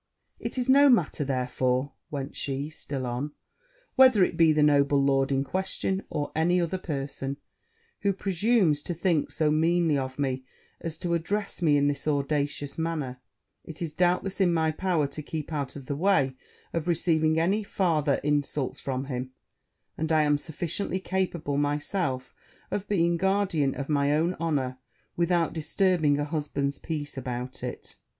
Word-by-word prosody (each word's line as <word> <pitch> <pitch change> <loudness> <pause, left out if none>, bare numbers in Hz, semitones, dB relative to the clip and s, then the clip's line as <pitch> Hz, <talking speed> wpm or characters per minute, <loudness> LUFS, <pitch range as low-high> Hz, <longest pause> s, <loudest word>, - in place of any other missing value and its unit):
'It - - -5
is 250 0 0
no 280 +2 +7
matter, 175 - +3
therefore,' 130 0 0 0.2
went 140 -1 -5
she 140 +2 -2
still 140 -4 -5
on, 125 +5 -3 0.6
'whether 260 -7 +7
it - - +1
be 165 -1 +5
the 150 -1 +3
noble 145 -1 +4
lord 135 0 +2
in 135 0 +2
question, 190 +3 -2
or 145 - -3
any 175 +3 +3
other 175 +2 -1
person 140 -4 -4 0.6
who 200 - +2
presumes 195 -4 +2
to 175 - -4
think 170 -3 +1
so 155 -2 +1
meanly 165 0 +3
of 130 -1 -4
me 130 -2 -1 0.4
as 165 -1 -4
to 175 -1 -2
address 200 +4 -2
me 150 -4 +4
in 140 - +3
this 145 0 -2
audacious 145 0 -1
manner; 150 -6 -3 0.4
it 160 - -9
is, 165 -3 -4
doubtless, 180 +3 +1
in 180 -2 +4
my 160 -1 +2
power 170 -2 0
to 140 +2 -6
keep 155 +1 -5
out 140 -3 -3
of 140 -2 -8
the 140 - -3
way 145 -6 +2 0.4
of 165 0 -2
receiving 160 -2 +2
any 190 +6 +2
farther 160 -8 +1
insults 145 -2 0
from 130 -1 -3
him; 130 -1 -4 0.7
and 160 0 -1
I 155 -1 +4
am 145 -1 +2
sufficiently 175 +5 -3
capable 180 -6 -1
myself 145 -1 -1 0.4
of 200 0 -2
being 170 -4 +2
guardian 190 -7 +1
of 140 - -4
my 145 -1 +2
own 165 +4 +1
honour, 135 -6 -1 0.4
without 170 -1 +1
disturbing 160 -2 +2
a 145 - -1
husband's 145 -2 -2
peace 150 -4 -4
about 125 0 -5
it.' - - -7
155 Hz, 160 wpm, -27 LUFS, 140-175 Hz, 0.7 s, no